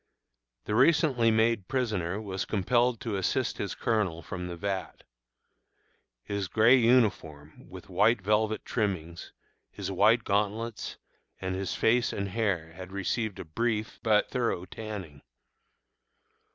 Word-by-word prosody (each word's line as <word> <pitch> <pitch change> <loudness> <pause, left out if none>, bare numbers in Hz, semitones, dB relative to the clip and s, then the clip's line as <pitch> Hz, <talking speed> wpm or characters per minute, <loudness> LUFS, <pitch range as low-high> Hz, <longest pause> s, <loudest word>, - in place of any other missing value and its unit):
The - - -2
recently 130 -2 +4
made 110 -3 +2
prisoner 105 -8 -1
was 95 -3 -4
compelled 120 +3 +1
to 105 -4 -2
assist 95 - -1
his - - -3
Colonel 100 -8 -1
from 90 +2 -5
the 85 - -5
vat. 95 -1 -4 1.2
His 100 -2 -3
gray 110 +7 +5
uniform, 105 - +1
with 95 -1 -11
white 105 +5 +3
velvet 110 +2 0
trimmings, 85 -7 -3 0.4
his - - -5
white 110 +5 +4
gauntlets, 105 +2 -2 0.4
and 95 0 -3
his 95 0 -3
face 120 +1 +2
and 100 0 -3
hair 95 -6 -1
had 95 +2 -9
received 100 +2 -2
a - - -7
brief 110 +6 -2
but 105 -2 +2
thorough 115 -8 -1
tanning. 95 -8 -8
105 Hz, 125 wpm, -28 LUFS, 95-115 Hz, 1.2 s, gray